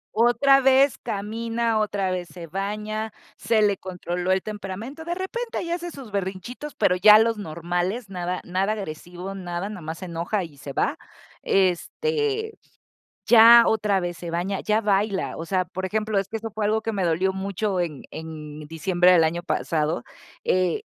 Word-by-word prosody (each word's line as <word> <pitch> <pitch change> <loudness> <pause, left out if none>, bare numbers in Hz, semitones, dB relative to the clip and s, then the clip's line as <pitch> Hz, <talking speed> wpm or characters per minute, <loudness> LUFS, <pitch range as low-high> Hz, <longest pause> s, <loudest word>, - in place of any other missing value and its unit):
Otra 270 +4 +5
vez 270 0 +4
camina, 225 +2 -2
otra 200 -3 0
vez 180 -1 -3
se 175 -2 -9
baña, 210 +5 -3 0.2
se 225 -2 +2
le 200 -2 +3
controló 180 0 -3
el 190 0 +2
temperamento. 215 +8 -6
De 345 +2 -3
repente 455 +6 -4
ahí 340 - -3
hace 345 0 -3
sus 270 -9 -10
berrinchitos, 200 +9 -5
pero 180 - +3
ya 210 +3 +8
los 225 0 +2
normales. 175 +5 -3
Nada, 180 0 -3
nada 190 +4 0
agresivo, 180 0 -6
nada, 180 +1 -4
nomás 165 -5 -6
se - - -6
enoja 175 +4 -2
y 155 -4 -11
se 140 0 -8
va. - - -1 0.4
Este, 440 - 0 0.7
ya 235 0 +9
otra 210 -2 +2
vez 175 -1 -3
se 170 +1 -6
baña, 180 +4 -2
ya 215 +1 +1
baila. 200 -1 0
O 165 - -5
sea, 185 +1 +1
por 185 +1 -6
ejemplo, 215 +2 -1
es 195 -1 +1
que 225 - -4
eso 225 0 -6
fue 215 - -1
algo 215 +1 +1
que 225 +1 -3
me 195 -3 -1
dolió 175 +3 +1
mucho 195 0 -2
en 160 -6 -3
en 155 -2 -8
diciembre 175 +3 +3
del 175 -3 +6
año 170 +2 -1
pasado. 160 -2 -1 0.4
Eh, 185 - +1
195 Hz, 170 wpm, -24 LUFS, 175-220 Hz, 0.7 s, ya